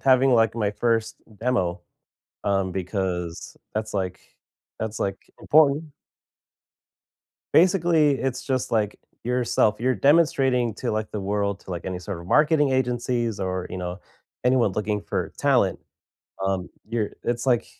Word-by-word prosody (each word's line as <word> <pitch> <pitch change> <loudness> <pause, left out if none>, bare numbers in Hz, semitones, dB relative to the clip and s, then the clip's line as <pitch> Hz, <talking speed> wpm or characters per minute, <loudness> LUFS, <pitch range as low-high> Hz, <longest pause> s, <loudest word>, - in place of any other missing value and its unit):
having, 130 0 +5
like, 115 -2 +4
my 105 -3 +1
1st 115 0 0 0.2
demo, 95 -8 0 0.6
um, 95 -2 +1
because 90 -2 -3 0.2
that's, 110 0 -3
like 95 -2 -2 0.6
that's, 110 0 -3
like, 95 -1 -1 0.2
important. 150 0 +4 1.7
Basically, 170 -4 +5
it's 130 -1 -2
just, 130 -3 -1
like, 105 -3 0 0.3
yourself 120 -3 +2
you're 130 +2 +2
demonstrating 135 - +3
to, - - -3
like, 110 0 -2
the 105 - -4
world, 100 0 -1
to, - - -12
like, 85 -1 -4
any 95 -1 -3
sort 90 -1 -6
of 85 - -11
marketing 150 - +4
agencies, 120 -4 0
or, 95 -1 -2
you - - -6
know, 90 0 -4 0.5
anyone 125 -5 +3
looking 105 +1 -1
for - - -3
talent. - - +2 0.7
Um, 95 -2 -1 0.2
your 110 -2 -1
it's, 120 +1 -1
like, 125 -3 +2
110 Hz, 140 wpm, -24 LUFS, 95-130 Hz, 1.7 s, having